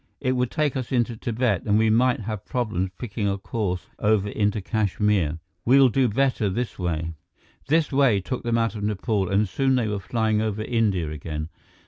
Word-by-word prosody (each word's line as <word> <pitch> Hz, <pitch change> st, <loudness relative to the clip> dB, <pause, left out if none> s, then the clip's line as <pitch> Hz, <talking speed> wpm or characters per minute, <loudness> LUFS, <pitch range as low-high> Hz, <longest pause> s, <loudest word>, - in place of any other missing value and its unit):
It 130 Hz, -, 0 dB
would 125 Hz, -1 st, 0 dB
take 150 Hz, -3 st, 0 dB
us 130 Hz, -1 st, -4 dB
into 120 Hz, -2 st, +1 dB
Tibet, 115 Hz, -3 st, 0 dB
and 105 Hz, 0 st, +4 dB
we 110 Hz, 0 st, +3 dB
might 125 Hz, +3 st, +3 dB
have 110 Hz, -2 st, -5 dB
problems 110 Hz, -7 st, -2 dB
picking 105 Hz, -3 st, -3 dB
a 100 Hz, -, -1 dB
course 95 Hz, -3 st, -3 dB
over 105 Hz, -1 st, +2 dB
into 105 Hz, +1 st, 0 dB
Kashmir. 100 Hz, -5 st, 0 dB, 0.3 s
We'll 135 Hz, +1 st, +6 dB
do 130 Hz, +2 st, +2 dB
better 120 Hz, -2 st, +1 dB
this 120 Hz, +4 st, -3 dB
way." 85 Hz, -2 st, -2 dB, 0.5 s
This 160 Hz, +2 st, +2 dB
way 135 Hz, -7 st, +4 dB
took 125 Hz, +7 st, -4 dB
them 120 Hz, 0 st, 0 dB
out 115 Hz, 0 st, +1 dB
of 105 Hz, -, -6 dB
Nepal, 105 Hz, -2 st, 0 dB
and 100 Hz, +2 st, +2 dB
soon 135 Hz, +7 st, +1 dB
they 120 Hz, -3 st, +1 dB
were 105 Hz, -1 st, -2 dB
flying 110 Hz, +2 st, 0 dB
over 110 Hz, -1 st, -2 dB
India 105 Hz, -9 st, 0 dB
again. 75 Hz, +1 st, -5 dB
110 Hz, 185 wpm, -24 LUFS, 100-125 Hz, 0.5 s, We'll